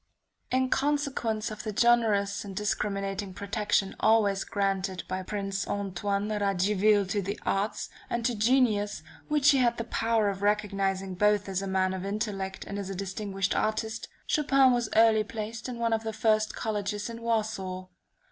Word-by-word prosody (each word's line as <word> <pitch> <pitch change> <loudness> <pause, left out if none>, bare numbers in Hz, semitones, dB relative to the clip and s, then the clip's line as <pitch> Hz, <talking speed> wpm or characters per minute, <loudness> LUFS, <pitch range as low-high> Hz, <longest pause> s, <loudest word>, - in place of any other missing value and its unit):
In 260 0 +1
consequence 270 -6 0
of 215 - -6
the 215 - -4
generous 220 -3 +2
and 195 -2 -8
discriminating 195 -1 -2
protection 200 -1 0
always 210 -3 +3
granted 195 -2 -1
by 185 0 -3
Prince 195 0 -3
Antoine 200 +1 -2
Radziwill 205 0 +2
to 205 0 0
the 200 +2 -4
arts, 200 +2 -1 0.2
and 235 -1 -2
to 245 - +2
genius, 215 -5 +2 0.2
which 300 -2 +4
he 275 - +3
had 240 -2 +2
the 230 - -2
power 225 -2 +1
of 195 0 -4
recognizing 195 -2 0
both 210 +2 +2
as 190 -1 -2
a 195 - -4
man 190 0 +1
of 185 -1 -4
intellect 195 -2 -3
and 200 +1 -5
as 195 -1 -5
a 195 - -4
distinguished 195 0 -2
artist; 220 +1 -1 0.2
Chopin 275 -3 +4
was 240 -2 0
early 220 -1 +5
placed 220 +2 -6
in 245 - -5
one 230 -1 +1
of 220 - +1
the 220 0 -3
first 215 0 +1
colleges 205 -1 -2
in 230 0 -7
Warsaw. 210 -5 -2
210 Hz, 165 wpm, -28 LUFS, 195-225 Hz, 0.2 s, early